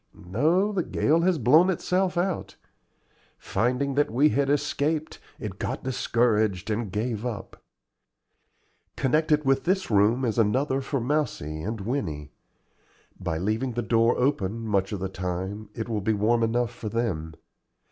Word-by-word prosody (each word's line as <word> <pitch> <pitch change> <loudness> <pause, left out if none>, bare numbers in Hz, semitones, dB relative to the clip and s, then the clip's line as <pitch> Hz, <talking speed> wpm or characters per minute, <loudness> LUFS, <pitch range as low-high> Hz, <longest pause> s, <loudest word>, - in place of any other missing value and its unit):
"No, 155 - +1
the 195 -3 0
gale 165 0 +1
has 180 0 +2
blown 155 - +5
itself 180 0 0
out. 180 0 -1 0.8
Finding 125 +4 0
that 145 +2 +2
we 135 +7 +4
had 140 -2 +1
escaped, 150 +2 -1 0.2
it 100 -3 -6
got - - -3
discouraged 110 -6 +1
and 105 -2 -2
gave 110 +1 -2
up. 120 -4 -6 1.3
Connected 150 +2 +2
with 135 0 +2
this 190 -5 0
room 110 +5 +3
is 115 0 0
another 130 +5 +1
for 140 +1 -2
Mousie 120 - -2
and 110 +4 -4
Winnie. 95 - -3 0.9
By 80 - -2
leaving 110 +8 -1
the 120 +1 -2
door 115 +1 +3
open 115 -5 0
much 100 -2 +1
of 105 - -3
the 95 - -1
time 95 +3 -4
it 110 - -4
will 110 -3 -2
be 110 +3 +1
warm 110 +3 +2
enough 115 +1 +1
for 110 -2 -6
them. 90 -9 -2
120 Hz, 145 wpm, -26 LUFS, 105-140 Hz, 1.3 s, blown